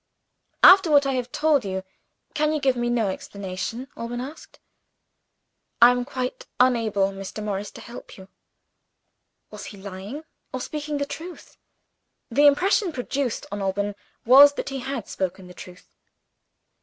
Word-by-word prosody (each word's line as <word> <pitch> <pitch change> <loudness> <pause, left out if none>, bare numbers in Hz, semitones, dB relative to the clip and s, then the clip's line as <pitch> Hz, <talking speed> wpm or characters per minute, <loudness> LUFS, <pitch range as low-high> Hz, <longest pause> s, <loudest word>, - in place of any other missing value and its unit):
"After 380 -2 +8
what 285 -2 +5
I 275 - 0
have 250 -1 -3
told 300 -4 +2
you, 190 -1 -4 0.5
can 305 0 +1
you 305 - 0
give 270 -2 +2
me 240 0 -1
no 230 -4 +1
explanation?" 200 +6 -6
Alban 235 +1 -5
asked. 275 +6 -9 1.2
"I 240 +1 +8
am 245 0 -1
quite 255 -2 -5
unable, 225 -6 +2
Mr. 195 +2 -7
Morris, 205 -1 -3
to - - -12
help 235 - -11
you." 190 -1 -13 1.2
Was - - -9
he 205 - -10
lying? 200 +9 -8 0.3
or 255 - -4
speaking, 300 +3 -4
the 285 - -1
truth? 340 +5 -9 0.8
The 290 +5 +5
impression 370 +6 +3
produced 260 -2 -3
on 205 0 -4
Alban 200 +1 -1 0.3
was 280 +4 +8
that - - -4
he 270 -1 -4
had 260 -3 -5
spoken 190 0 -4
the 180 - -12
truth. 180 +1 -13
245 Hz, 150 wpm, -24 LUFS, 200-285 Hz, 1.2 s, After